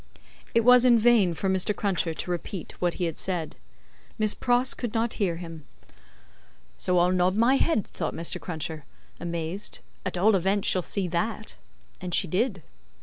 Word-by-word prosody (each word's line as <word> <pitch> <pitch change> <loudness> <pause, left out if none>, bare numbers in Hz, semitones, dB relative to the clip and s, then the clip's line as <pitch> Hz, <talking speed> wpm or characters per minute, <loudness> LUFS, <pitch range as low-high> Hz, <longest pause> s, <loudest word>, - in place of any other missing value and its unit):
It 230 - +5
was 250 +1 +6
in 245 -2 +6
vain 220 -6 +4
for 195 - -2
Mr. 190 +2 +1
Cruncher 180 -5 0
to 180 - -4
repeat 175 0 -5
what 175 -1 0
he 175 -3 -1
said; 170 -2 -3 0.6
Miss 215 -1 +3
Pross 245 +1 +2
could 240 -3 -5
not 225 +1 +1
hear 180 -4 +1
him. 165 -2 -9 1.2
"So 180 - +1
I'll 175 +1 +4
nod 185 +1 +2
my 235 +5 +4
head," 270 - +1
thought - - -5
Mr. 165 0 -2
Cruncher, 160 -2 -5 0.4
amazed, 170 +3 -4 0.3
"at 185 -1 -3
all 205 +4 +4
events 195 +2 +1
she'll 185 - +2
see 190 +1 -2
that." 175 - -2 0.5
And 180 -1 0
she 190 - +3
did. 190 - -1
185 Hz, 165 wpm, -26 LUFS, 170-220 Hz, 1.2 s, was